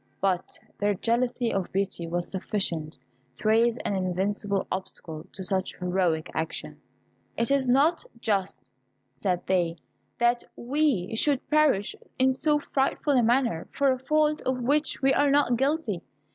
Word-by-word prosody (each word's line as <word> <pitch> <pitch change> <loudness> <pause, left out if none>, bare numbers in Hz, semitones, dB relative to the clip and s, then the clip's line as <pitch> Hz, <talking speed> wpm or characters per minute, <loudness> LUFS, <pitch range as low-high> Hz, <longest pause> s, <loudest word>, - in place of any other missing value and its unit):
But 185 -2 -1 0.2
their 205 0 +1
jealousy 240 +3 0
of 195 -2 -2
Beauty 190 -3 -2
was 175 +1 -2
sufficient 175 -5 -2 0.4
to 215 - -4
raise 230 +2 +4
an 200 - 0
invincible 195 +2 0
obstacle 165 -3 -6
to 190 - -6
such 190 0 -1
heroic 180 -3 0
action. 160 +1 -4 0.6
"It 230 +3 0
is 270 -2 +2
not 290 +7 +3 0.2
just," 190 - -2 0.4
said 175 +7 -2
they, 175 -3 +1 0.4
"that 240 0 +2
we 250 - 0
should 275 +3 +2
perish 300 -10 +3 0.2
in 260 0 +4
so 295 +3 +2
frightful 285 0 0
a 255 - +4
manner 235 -7 +1
for 280 -1 +2
a 255 - -1
fault 305 +2 +1
of 255 -1 -2
which 290 +2 +1
we 270 0 +5
are 290 - +3
not 280 -3 +3
guilty. 270 - 0
225 Hz, 145 wpm, -27 LUFS, 185-270 Hz, 0.6 s, we